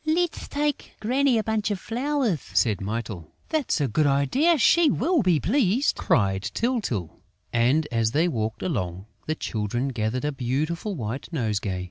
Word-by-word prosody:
"Let's 330 +2 0
take 295 -1 -2
Granny 255 +3 +2
a 220 - +1
bunch 220 -1 0
of 205 -3 -2
flowers," 245 - -1
said 110 -5 +2
Mytyl. 105 -5 -4 0.2
"That's 310 - 0
a 145 - +1
good 145 +6 +2
idea! 250 - +3
She 330 +4 +5
will 335 +2 +2
be 180 -6 +3
pleased!" 235 - +2
cried 95 -3 +1
Tyltyl. 200 - -2 0.3
And, 130 +7 +3
as 115 -2 +2
they 155 +8 +2
walked 110 -7 -2
along, 95 - -3 0.2
the 155 - 0
Children 120 +2 -2
gathered 120 +2 -2
a 150 - 0
beautiful 150 - -2
white 115 -1 -5
nosegay. 105 - -1
150 Hz, 155 wpm, -25 LUFS, -, 0.3 s, She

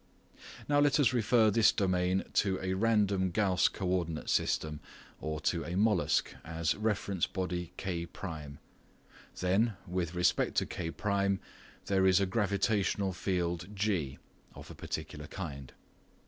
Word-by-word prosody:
Now 145 0 +3
let 145 +1 +4
us 135 -3 +4
refer 115 -2 +4
this 110 +1 +5
domain 95 -1 +1
to 95 -2 +2
a 95 0 -2
random 100 -2 +2
Gauss 95 0 +3
coordinate 90 -4 -2
system 75 -1 0 0.4
or 75 0 -3
to - - 0
a 85 +4 -3
"mollusc" 105 -3 +2
as 80 -1 -1
reference 100 -4 -1
body 90 -2 -3
K1. 85 -5 -5 0.8
Then 95 +3 +2
with 90 -2 -3
respect 90 0 +2
to - - +2
K1 100 +3 -1 0.5
there 95 -1 +3
is 95 0 +5
a 100 - +2
gravitational 100 -1 0
field 85 -2 -2
G 90 -10 -1 0.4
(of - - -10
a - - -8
particular 75 +1 -6
kind). 70 -9 -7
95 Hz, 130 wpm, -31 LUFS, 85-100 Hz, 0.8 s, this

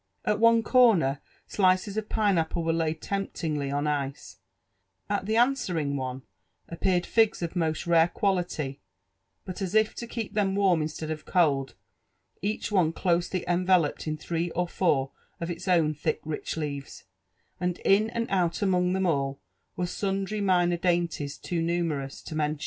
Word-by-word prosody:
At 210 0 +1
one 230 0 +5
corner, 205 - +4 0.2
slices 190 +1 +2
of 215 -1 -3
pineapple 180 -5 +1
were 165 0 +1
laid 160 -1 -1
temptingly 160 -7 -2
on 145 +1 -1
ice; 140 -2 -3 0.7
at 200 -1 -1
the 220 - +1
answering 185 - +1
one 130 -1 -4 0.4
appeared 175 +1 0
figs 220 -5 +2
of 170 +1 -4
most 160 -3 -1
rare 165 -1 +5
quality, 175 -8 -1 0.6
but, 185 +1 -6
as 190 +1 -3
if 220 0 +3
to 235 - -7
keep 230 -3 -5
them 200 -2 +1
warm 190 -5 +3
instead 155 +1 -4
of 155 -1 -5
cold, 140 -7 +1 0.7
each 210 +2 -2
one 175 -5 +3
closely 175 +1 0
enveloped 175 -3 +2
in 155 0 -2
three 170 +2 -2
or 180 +1 +1
foor 140 -7 +1 0.3
of 170 +1 -3
its 170 +3 -7
own 165 -4 +3
thick 155 +1 -2
rich 155 +1 -4
leaves; 140 -3 -5 0.6
and 180 0 -1
in 210 +3 +4
and 230 0 -2
out 180 0 +1
among 180 -2 +2
them 190 0 0
all 140 -5 0 0.4
were 180 - -1
sundry 195 +3 -2
minor 175 -3 +3
dainties 170 -5 -1
too 170 -2 -3
numerous 165 -5 -2
to - - -7
mention. 150 -1 -1
175 Hz, 160 wpm, -27 LUFS, 155-195 Hz, 0.7 s, one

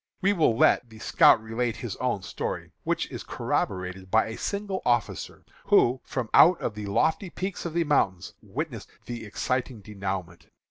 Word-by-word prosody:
We 200 +1 +3
will 155 - +2
let 120 - +4
the 110 - -13
scout 110 - +5
relate 115 +1 -2
his 115 -6 -5
own 125 -7 -1
story, - - -4
which - - 0
is - - -6
corroborated 95 0 -3
by 110 +4 +4
a 110 - -5
signal 200 - -3
officer, 120 -2 -1 0.2
who, 125 +2 +4
from 130 -4 -3
one 175 +3 +8
of 110 - -2
the 105 -1 -6
lofty 160 - +1
peaks 185 +1 -5
of 170 -1 -4
the 170 - +3
mountains, 95 - +1
witnessed - - -5 0.2
the 120 -2 -6
exciting 120 +2 -2
denouement. 95 -3 -5
120 Hz, 170 wpm, -27 LUFS, 100-155 Hz, 0.2 s, one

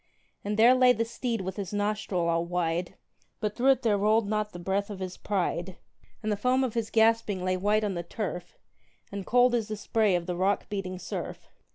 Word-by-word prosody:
And 205 +1 -2
there 235 +3 +7
lay 255 -1 +6
the 230 -1 -1
steed 230 -1 -3
with 190 +1 -5
his 195 -3 -4
nostril 205 -4 -1
all 165 0 +1
wide, 175 0 -2 0.4
But 210 -2 -2
through 255 +2 +2
it 265 -2 +4
there 210 -3 +2
rolled 215 +1 +3
not 210 0 -1
the - - -8
breath 195 +3 -1
of 205 - -6
his 185 -1 -5
pride: 185 -2 -2 0.5
And 215 - -1
the 205 - 0
foam 255 +5 +2
of 250 -4 -1
his 230 -2 -2
gasping 220 -4 +2
lay 185 0 +1
white 210 +3 +1
on 205 -2 -1
the 175 - -3
turf, 180 -1 -5 0.5
And 200 -1 -6
cold 245 0 +4
as 230 -3 0
the 215 -1 -4
spray 210 -2 +1
of 175 -1 -1
the 180 0 -3
rock 190 +3 0
beating 195 -3 -4
surf. - - -6
205 Hz, 215 wpm, -28 LUFS, 185-225 Hz, 0.5 s, there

